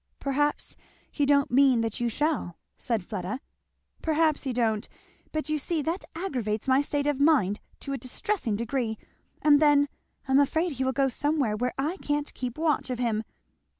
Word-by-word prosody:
"Perhaps 290 Hz, +2 st, -1 dB, 0.4 s
he 285 Hz, -2 st, 0 dB
don't 280 Hz, -2 st, +3 dB
mean 260 Hz, -2 st, +5 dB
that 225 Hz, -2 st, -2 dB
you 240 Hz, -1 st, +1 dB
shall," 285 Hz, -, -1 dB, 0.2 s
said 225 Hz, -7 st, -2 dB
Fleda. 195 Hz, +3 st, -4 dB, 0.6 s
"Perhaps 315 Hz, -1 st, +2 dB
he 265 Hz, -, 0 dB
don't; 225 Hz, -3 st, 0 dB, 0.4 s
but 310 Hz, 0 st, -2 dB
you 305 Hz, 0 st, 0 dB
see 315 Hz, +1 st, -1 dB
that 335 Hz, +5 st, -2 dB
aggravates 245 Hz, -, -2 dB
my 265 Hz, +1 st, +5 dB
state 285 Hz, 0 st, -1 dB
of 290 Hz, -2 st, 0 dB
mind 260 Hz, -, +4 dB, 0.2 s
to 275 Hz, -, -4 dB
a 270 Hz, -, -3 dB
distressing 255 Hz, -, -2 dB
degree. 230 Hz, 0 st, -2 dB, 0.5 s
And 290 Hz, -1 st, +6 dB
then 290 Hz, -1 st, +5 dB, 0.4 s
I'm 265 Hz, +1 st, +5 dB
afraid 320 Hz, +5 st, +2 dB
he 265 Hz, -2 st, -2 dB
will 260 Hz, -, +1 dB
go 270 Hz, +1 st, +2 dB
somewhere 280 Hz, -4 st, 0 dB
where 250 Hz, +3 st, -2 dB
I 305 Hz, +7 st, -1 dB
can't 295 Hz, -3 st, -2 dB
keep 250 Hz, 0 st, -5 dB
watch 310 Hz, -4 st, +1 dB
of 250 Hz, -, -2 dB
him! 230 Hz, -3 st, 0 dB
275 Hz, 175 wpm, -27 LUFS, 235-295 Hz, 0.6 s, And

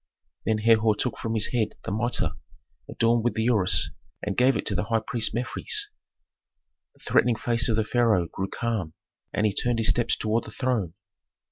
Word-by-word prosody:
Then 110 Hz, -1 st, +2 dB
Herhor 110 Hz, 0 st, +3 dB
took 125 Hz, +4 st, -2 dB
from 115 Hz, 0 st, -3 dB
his 110 Hz, -, +1 dB
head 115 Hz, -4 st, -1 dB
the -, -, -4 dB
mitre 120 Hz, +4 st, 0 dB, 0.6 s
adorned 115 Hz, 0 st, +1 dB
with 120 Hz, -, 0 dB
the 110 Hz, -, 0 dB
ureus, 95 Hz, -9 st, +3 dB, 0.3 s
and 100 Hz, -2 st, -2 dB
gave 130 Hz, +2 st, +4 dB
it -, -, -4 dB
to -, -, 0 dB
the 105 Hz, -, -1 dB
high 115 Hz, 0 st, 0 dB
priest 115 Hz, +1 st, -1 dB
Mefres. 410 Hz, -, 0 dB, 1.1 s
The -, -, -20 dB
threatening 120 Hz, -2 st, +3 dB
face 120 Hz, +2 st, +1 dB
of 110 Hz, -, +2 dB
the 110 Hz, -, +1 dB
pharaoh 110 Hz, -6 st, +2 dB
grew 95 Hz, +3 st, -4 dB
calm, 105 Hz, -8 st, -3 dB, 0.4 s
and 105 Hz, -, 0 dB
he 105 Hz, -, +1 dB
turned 120 Hz, +3 st, 0 dB
his 115 Hz, -, +1 dB
steps 120 Hz, -1 st, +2 dB
toward 110 Hz, +1 st, -1 dB
the -, -, -8 dB
throne. 110 Hz, -10 st, -2 dB
115 Hz, 190 wpm, -26 LUFS, 105-120 Hz, 1.1 s, gave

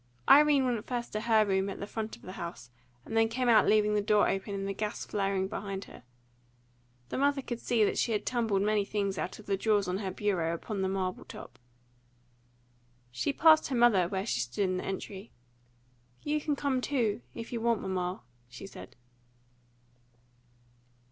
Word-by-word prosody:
Irene 290 Hz, -1 st, +6 dB
went 240 Hz, -4 st, -2 dB
first 240 Hz, -1 st, -4 dB
to 215 Hz, -, -1 dB
her 220 Hz, -1 st, +4 dB
own 215 Hz, -, +1 dB
room 190 Hz, 0 st, +1 dB
at 195 Hz, -, -6 dB
the -, -, -4 dB
front 220 Hz, +1 st, -5 dB
of -, -, -21 dB
the 185 Hz, -, -8 dB
house, 170 Hz, -10 st, -7 dB, 0.3 s
and 225 Hz, -, -6 dB
then 225 Hz, 0 st, +4 dB
came 250 Hz, +2 st, -1 dB
out 220 Hz, -4 st, +5 dB
leaving 210 Hz, 0 st, +4 dB
the 210 Hz, -, +2 dB
door 210 Hz, 0 st, +3 dB
open 195 Hz, +1 st, -2 dB
and 195 Hz, 0 st, -3 dB
the 195 Hz, -, -2 dB
gas 210 Hz, +1 st, -4 dB
flaring 195 Hz, -2 st, -1 dB
behind 195 Hz, -1 st, -5 dB
her. -, -, -13 dB, 1.1 s
The -, -, -3 dB
mother 280 Hz, 0 st, +2 dB
could 240 Hz, -2 st, -5 dB
see 235 Hz, -3 st, +2 dB
that -, -, 0 dB
she 235 Hz, -, +1 dB
had 210 Hz, -, -1 dB
tumbled 225 Hz, -5 st, +1 dB
many 210 Hz, 0 st, +2 dB
things 200 Hz, -1 st, -2 dB
out 185 Hz, -, -4 dB
of 215 Hz, -, -13 dB
the 200 Hz, -, 0 dB
drawers 205 Hz, -1 st, +1 dB
of 180 Hz, +1 st, -1 dB
her 195 Hz, -2 st, -3 dB
bureau 185 Hz, -4 st, -1 dB
upon 200 Hz, +3 st, -4 dB
the 190 Hz, -, 0 dB
marble 185 Hz, -1 st, -2 dB
top. 130 Hz, +1 st, -11 dB, 1.5 s
She 125 Hz, -, -1 dB
passed 315 Hz, +2 st, +5 dB
her 270 Hz, -, -2 dB
mother, 230 Hz, -7 st, +4 dB
where 190 Hz, +1 st, -3 dB
she 125 Hz, -, -1 dB
stood 125 Hz, +11 st, -1 dB
in 185 Hz, 0 st, -1 dB
the -, -, -4 dB
entry. 195 Hz, +2 st, -6 dB, 0.9 s
"You 300 Hz, +1 st, 0 dB
can 295 Hz, -1 st, -1 dB
come 275 Hz, -2 st, 0 dB
too, 240 Hz, -6 st, 0 dB
if 230 Hz, +1 st, -7 dB
you 230 Hz, -, -2 dB
want 235 Hz, -2 st, +1 dB
to, -, -, -4 dB
mamma," 180 Hz, -3 st, -2 dB, 0.3 s
she 125 Hz, -, -10 dB
said. 195 Hz, -, -11 dB
210 Hz, 195 wpm, -30 LUFS, 190-235 Hz, 1.5 s, Irene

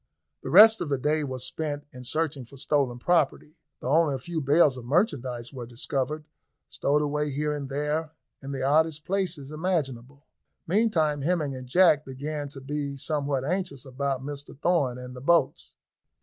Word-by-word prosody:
The -, -, -6 dB
rest 220 Hz, 0 st, +8 dB
of 170 Hz, -, -2 dB
the 140 Hz, -, +1 dB
day 150 Hz, +3 st, 0 dB
was 130 Hz, -3 st, -4 dB
spent 145 Hz, +1 st, -3 dB
in 125 Hz, 0 st, -9 dB
searching 155 Hz, -1 st, -1 dB
for 130 Hz, +4 st, -14 dB
stolen 135 Hz, -3 st, 0 dB
property, 165 Hz, +1 st, 0 dB, 0.2 s
though 130 Hz, -, -2 dB
only 155 Hz, -2 st, +3 dB
a -, -, -2 dB
few 160 Hz, +5 st, -4 dB
bales 145 Hz, 0 st, +4 dB
of 125 Hz, -, -8 dB
merchandise 130 Hz, -, -1 dB
were 125 Hz, -3 st, -7 dB
discovered, 135 Hz, +5 st, -3 dB, 0.4 s
stowed 150 Hz, +2 st, +1 dB
away 150 Hz, 0 st, -1 dB
here 150 Hz, +2 st, -1 dB
and 140 Hz, -2 st, -5 dB
there, 150 Hz, +3 st, -2 dB, 0.3 s
in 135 Hz, -, -8 dB
the 135 Hz, -1 st, -3 dB
oddest 155 Hz, +2 st, +2 dB
places 175 Hz, -7 st, -2 dB
imaginable. 145 Hz, -5 st, -3 dB, 0.4 s
Meantime 165 Hz, -7 st, +2 dB
Hemming 150 Hz, -3 st, 0 dB
and 130 Hz, -1 st, -8 dB
Jack 155 Hz, 0 st, +5 dB
began 145 Hz, +2 st, -5 dB
to 135 Hz, -1 st, -10 dB
be 140 Hz, 0 st, -4 dB
somewhat 140 Hz, -2 st, -1 dB
anxious 170 Hz, -6 st, -3 dB
about 135 Hz, 0 st, -2 dB
Mr 145 Hz, -1 st, -7 dB
Thorn 145 Hz, -8 st, +1 dB
and 125 Hz, 0 st, -9 dB
the 125 Hz, -, -9 dB
boats. 170 Hz, +4 st, +1 dB
145 Hz, 170 wpm, -27 LUFS, 135-155 Hz, 0.4 s, rest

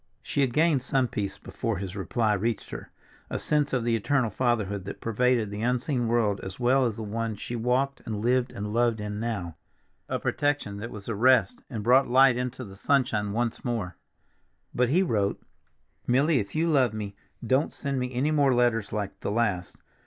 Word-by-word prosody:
She 145 Hz, -, -1 dB
had 135 Hz, -3 st, +2 dB
gained 155 Hz, 0 st, +3 dB
some 130 Hz, 0 st, +1 dB
peace 100 Hz, -4 st, -4 dB
before 115 Hz, -5 st, -3 dB
his 95 Hz, 0 st, -5 dB
reply 105 Hz, +3 st, 0 dB
reached 110 Hz, +2 st, -2 dB
her—a -, -, -9 dB
sense 150 Hz, -1 st, +1 dB
of 125 Hz, -3 st, 0 dB
the 115 Hz, 0 st, +2 dB
eternal 120 Hz, +1 st, +1 dB
Fatherhood 105 Hz, -4 st, 0 dB
that 100 Hz, -, -7 dB
pervaded 115 Hz, -1 st, +1 dB
the 105 Hz, +1 st, -5 dB
unseen 125 Hz, +1 st, 0 dB
world 115 Hz, -4 st, +1 dB
as 95 Hz, +3 st, -8 dB
well 130 Hz, +2 st, +3 dB
as 110 Hz, -, -3 dB
the 110 Hz, -, -6 dB
one 110 Hz, +1 st, -3 dB
she 120 Hz, +4 st, -6 dB
walked 125 Hz, +4 st, 0 dB
and 110 Hz, -2 st, -2 dB
lived 125 Hz, +2 st, +1 dB
and 105 Hz, -3 st, -5 dB
loved 115 Hz, -1 st, +2 dB
in 105 Hz, 0 st, -4 dB
now—a 100 Hz, -8 st, -6 dB
protection 145 Hz, -8 st, -1 dB
that 110 Hz, +3 st, -6 dB
was 105 Hz, -4 st, -9 dB
a 115 Hz, -, -1 dB
rest 130 Hz, -, +3 dB
and 110 Hz, -5 st, -4 dB
brought 130 Hz, +4 st, +5 dB
light 130 Hz, 0 st, +6 dB
into 125 Hz, 0 st, -3 dB
the 95 Hz, -1 st, -11 dB
sunshine 105 Hz, -3 st, +1 dB
once 115 Hz, +2 st, -2 dB
more. 115 Hz, -8 st, -2 dB, 0.8 s
But 125 Hz, -1 st, +2 dB
he 180 Hz, +7 st, +4 dB
wrote, 105 Hz, -, 0 dB, 0.7 s
"Milly, 140 Hz, +4 st, +3 dB
if 100 Hz, +4 st, -5 dB
you 165 Hz, +2 st, +2 dB
love 130 Hz, -8 st, +3 dB
me, 100 Hz, -2 st, -5 dB, 0.3 s
don't 130 Hz, +6 st, +2 dB
send 140 Hz, -2 st, -3 dB
me 125 Hz, 0 st, -2 dB
any 130 Hz, +5 st, 0 dB
more 140 Hz, -4 st, +3 dB
letters 120 Hz, -3 st, +1 dB
like 105 Hz, -2 st, -4 dB
the -, -, -3 dB
last. 100 Hz, -5 st, -1 dB
120 Hz, 190 wpm, -27 LUFS, 105-130 Hz, 0.8 s, light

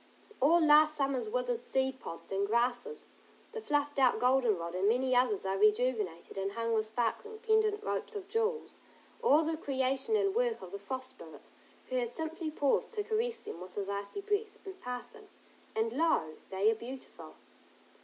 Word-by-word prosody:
All 320 Hz, +6 st, +5 dB
last 305 Hz, -1 st, +6 dB
summer's 275 Hz, +4 st, 0 dB
withered -, -, -1 dB
seed 265 Hz, 0 st, 0 dB
pods 165 Hz, -, -9 dB
and 195 Hz, +1 st, 0 dB
grasses; 245 Hz, -, 0 dB, 0.5 s
the 450 Hz, -1 st, -5 dB
fluffed 290 Hz, -6 st, 0 dB
out 255 Hz, -2 st, +5 dB
goldenrod, 235 Hz, -10 st, +2 dB
and 190 Hz, +3 st, +2 dB
many 255 Hz, +2 st, +2 dB
others 240 Hz, -6 st, +2 dB
are 190 Hz, 0 st, -1 dB
rejuvenated 210 Hz, -5 st, +1 dB
and 195 Hz, +1 st, -2 dB
hung 230 Hz, +1 st, -1 dB
with 215 Hz, -1 st, +2 dB
sparkling, 240 Hz, -, -2 dB
pendent 435 Hz, -2 st, +2 dB
ropes 450 Hz, -, -3 dB
of 390 Hz, -2 st, -5 dB
jewels, 450 Hz, +2 st, -1 dB, 0.4 s
all 320 Hz, -9 st, +5 dB
the 320 Hz, +1 st, -1 dB
creation 270 Hz, +4 st, 0 dB
and 400 Hz, -2 st, +2 dB
work 475 Hz, 0 st, +1 dB
of -, -, -9 dB
the 400 Hz, -, -5 dB
Frost 260 Hz, -6 st, -5 dB
Spirit, 160 Hz, -3 st, -13 dB, 0.4 s
who 255 Hz, -, -1 dB
has 240 Hz, -2 st, 0 dB
simply 320 Hz, +3 st, -3 dB
paused 290 Hz, -2 st, +1 dB
to 420 Hz, -2 st, -1 dB
caress 455 Hz, +2 st, -1 dB
them 170 Hz, -, -8 dB
with 185 Hz, 0 st, -10 dB
his 200 Hz, -1 st, -3 dB
icy 200 Hz, -, -3 dB
breath, 420 Hz, +1 st, -1 dB
in 385 Hz, -, -6 dB
passing, 375 Hz, -, -5 dB, 0.5 s
and 225 Hz, +1 st, +1 dB
lo, 275 Hz, -, +1 dB, 0.2 s
they 195 Hz, +3 st, +3 dB
are -, -, +2 dB
beautiful. 250 Hz, +4 st, -9 dB
265 Hz, 175 wpm, -32 LUFS, -, 0.5 s, last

